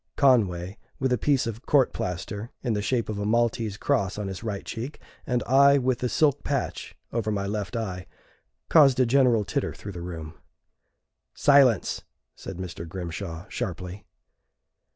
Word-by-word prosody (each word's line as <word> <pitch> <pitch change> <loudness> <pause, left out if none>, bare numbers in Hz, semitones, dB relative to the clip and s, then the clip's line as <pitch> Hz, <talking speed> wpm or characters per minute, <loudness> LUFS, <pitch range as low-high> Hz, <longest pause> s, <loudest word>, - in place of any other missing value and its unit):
Conway, 100 -8 +2 0.2
with 130 -1 +1
a - - +2
piece 140 -3 +2
of 115 +2 -6
court 140 -4 +4
plaster 100 +5 -4
in 120 -4 0
the 105 - -1
shape 115 +4 0
of 105 -2 -4
a - - -2
Maltese 115 -2 +1
cross 95 -1 0
on 105 -2 -3
his 95 - -6
right 105 -3 -4
cheek, 120 +6 -6 0.3
and 125 -3 0
I 140 +3 +6
with 130 -2 0
the 125 - -1
silk 145 0 +2
patch 140 -3 -3 0.2
over 115 -2 -1
my 100 -1 -1
left 100 -1 -3
eye, 95 -6 -4 0.6
caused 140 -5 +6
a 130 - +5
general 120 -4 +3
titter - - -2
through 100 - -8
the 90 -2 -7
room. 80 -3 -6 1.0
"Silence!" 135 -7 +4 0.3
said 95 - -8
Mr. 85 -2 -6
Grimshaw, 85 -1 -6
sharply. 90 +2 -5
110 Hz, 160 wpm, -26 LUFS, 95-125 Hz, 1.0 s, I